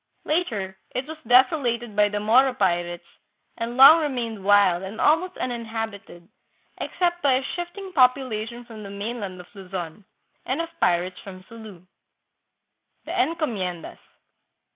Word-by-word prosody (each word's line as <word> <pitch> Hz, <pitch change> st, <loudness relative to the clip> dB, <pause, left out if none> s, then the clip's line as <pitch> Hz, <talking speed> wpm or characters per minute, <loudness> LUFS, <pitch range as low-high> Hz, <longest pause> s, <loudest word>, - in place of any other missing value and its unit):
Later 215 Hz, -, -2 dB, 0.2 s
it 255 Hz, -, -2 dB
was 315 Hz, +1 st, -9 dB
desolated 245 Hz, -3 st, +3 dB
by 210 Hz, 0 st, +4 dB
the 205 Hz, 0 st, -3 dB
Moro 250 Hz, +5 st, +4 dB
pirates 175 Hz, -4 st, -1 dB, 0.5 s
and 235 Hz, +1 st, -5 dB
long 295 Hz, +5 st, +9 dB
remained 235 Hz, -8 st, -3 dB
wild 200 Hz, -3 st, +4 dB
and 195 Hz, +3 st, -7 dB
almost 330 Hz, +4 st, +2 dB
uninhabited 225 Hz, -7 st, -5 dB, 0.5 s
except 350 Hz, -1 st, -1 dB
by 275 Hz, -2 st, +3 dB
a 260 Hz, +1 st, +1 dB
shifting 350 Hz, +5 st, -6 dB
population 245 Hz, -4 st, +1 dB
from 225 Hz, -2 st, -11 dB
the 200 Hz, -, -8 dB
mainland 200 Hz, -2 st, -5 dB
of 180 Hz, -, -10 dB
Luzon, 185 Hz, -1 st, -7 dB, 0.4 s
and -, -, -2 dB
of 335 Hz, 0 st, -3 dB
pirates 180 Hz, +1 st, +1 dB
from 185 Hz, -2 st, -11 dB
Sulu. 220 Hz, -6 st, -12 dB, 1.2 s
The -, -, -6 dB
Encomiendas. 215 Hz, -, -2 dB
225 Hz, 130 wpm, -24 LUFS, 195-265 Hz, 1.2 s, long